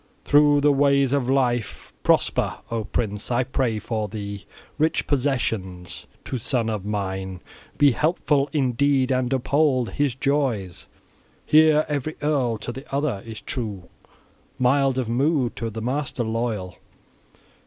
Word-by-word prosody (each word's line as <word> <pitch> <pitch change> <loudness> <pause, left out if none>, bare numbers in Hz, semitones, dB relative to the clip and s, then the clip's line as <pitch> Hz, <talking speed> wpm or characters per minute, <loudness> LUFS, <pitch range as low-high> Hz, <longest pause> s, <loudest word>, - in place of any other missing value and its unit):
Through 145 0 +5
the 145 0 +5
ways 140 -1 +3
of 135 -3 0
life 120 -5 0
prosper, - - +2 0.2
O 115 -2 -2
prince! 105 0 -3
I 125 +1 +2
pray 125 -3 -1
for 110 0 -3
thee 100 -1 -6 0.3
rich 155 +1 +1
possessions. 115 -10 -2 0.2
To 130 - -3
son 115 -1 0
of 105 -3 -3
mine 95 -2 -3 0.4
be 145 -1 +6
helpful 145 0 +1
in 140 -5 +1
deed 135 +1 +2
and 130 -1 0
uphold 130 -3 +1
his 140 +2 0
joys! 130 - -1 0.6
Here 155 0 +5
every 150 +1 -3
earl 135 -6 +1
to - - -3
the 135 +3 -9
other 140 -7 -1
is 110 -1 -8
true, 105 -9 -5 0.7
mild 135 +1 +2
of 130 -3 -1
mood, 130 +1 +1
to 115 - -3
the 110 0 -6
master 130 0 -2
loyal! 110 -5 -3
125 Hz, 140 wpm, -23 LUFS, 110-140 Hz, 0.7 s, be